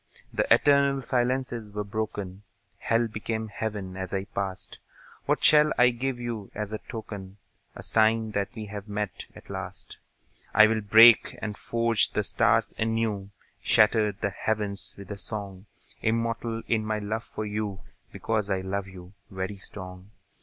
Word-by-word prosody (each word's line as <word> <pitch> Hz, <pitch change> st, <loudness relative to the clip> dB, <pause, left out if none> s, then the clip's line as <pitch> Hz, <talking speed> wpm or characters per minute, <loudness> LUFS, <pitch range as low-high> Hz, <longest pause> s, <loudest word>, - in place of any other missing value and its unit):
The -, -, -1 dB
eternal 140 Hz, -1 st, +5 dB
silences 125 Hz, -3 st, -1 dB
were 105 Hz, 0 st, -3 dB
broken; 100 Hz, -2 st, -4 dB, 0.4 s
Hell 115 Hz, +1 st, +1 dB
became 110 Hz, +1 st, -4 dB
Heaven 105 Hz, -3 st, -4 dB
as 95 Hz, 0 st, -4 dB
I 95 Hz, -, -1 dB
passed. 100 Hz, -2 st, -5 dB, 0.5 s
What -, -, +1 dB
shall 150 Hz, 0 st, +6 dB
I 125 Hz, 0 st, +6 dB
give 125 Hz, +1 st, -3 dB
you 115 Hz, -4 st, -5 dB
as 105 Hz, 0 st, -4 dB
a 110 Hz, -, -3 dB
token, 100 Hz, -4 st, -8 dB, 0.4 s
A -, -, -8 dB
sign 110 Hz, 0 st, +2 dB
that 100 Hz, +3 st, -2 dB
we 110 Hz, -2 st, -5 dB
have 105 Hz, 0 st, -7 dB
met, 105 Hz, -1 st, -4 dB
at -, -, -12 dB
last? -, -, -7 dB, 0.6 s
I'll 110 Hz, +1 st, +6 dB
break 110 Hz, +2 st, +7 dB
and 105 Hz, -1 st, -4 dB
forge 115 Hz, -1 st, 0 dB
the -, -, +1 dB
stars -, -, +2 dB
anew, 110 Hz, -3 st, -1 dB, 0.3 s
Shatter 105 Hz, 0 st, +4 dB
the 100 Hz, 0 st, -3 dB
heavens 105 Hz, 0 st, -2 dB
with 100 Hz, +1 st, -10 dB
a 100 Hz, -, -5 dB
song; 100 Hz, 0 st, -4 dB, 0.3 s
Immortal 115 Hz, 0 st, -1 dB
in 110 Hz, -2 st, +1 dB
my 110 Hz, 0 st, -1 dB
love 110 Hz, +2 st, -3 dB
for 110 Hz, -, -6 dB
you, 105 Hz, -2 st, -3 dB, 0.3 s
Because 110 Hz, -2 st, -1 dB
I 95 Hz, -1 st, 0 dB
love 95 Hz, +1 st, -3 dB
you, 90 Hz, -1 st, -12 dB, 0.2 s
very 95 Hz, +1 st, -4 dB
strong. 95 Hz, -1 st, -6 dB
105 Hz, 155 wpm, -27 LUFS, 100-115 Hz, 0.6 s, break